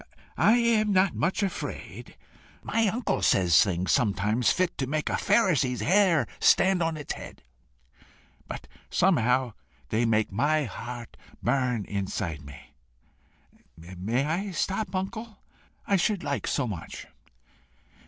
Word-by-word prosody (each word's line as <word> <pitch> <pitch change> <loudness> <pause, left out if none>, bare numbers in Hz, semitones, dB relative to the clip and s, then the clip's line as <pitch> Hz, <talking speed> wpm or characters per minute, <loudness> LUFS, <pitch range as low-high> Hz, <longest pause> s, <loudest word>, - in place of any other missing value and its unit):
"I 230 - +5
am 225 -3 +2
not 190 -1 +3
much 180 +6 0
afraid. 195 - -6 0.5
My 225 -1 +1
uncle 225 +5 -1
says 90 +2 +5
things 95 -3 -1
sometimes 110 0 +2
fit 185 -1 0
to 135 - -1
make 155 +2 -1
a - - -2
Pharisee's 140 - +2
hair 175 - +3
stand 190 -1 +4
on 165 -1 0
his 150 -2 -7
head, - - -11 1.0
but - - -7 0.2
somehow 130 - +2 0.4
they 115 - +1
make 110 -2 +1
my 145 +9 +1
heart 120 0 -8 0.3
burn 125 -4 0
inside 95 -5 -3
me. 70 0 -13 1.0
May 95 +10 -3
I 175 +7 -2
stop, 195 +4 -2
uncle? 215 +3 -4 0.5
I 200 - +2
should 200 +1 0
like 140 -1 -2
so 145 - 0
much!" 100 -8 -7
140 Hz, 125 wpm, -27 LUFS, -, 1.0 s, I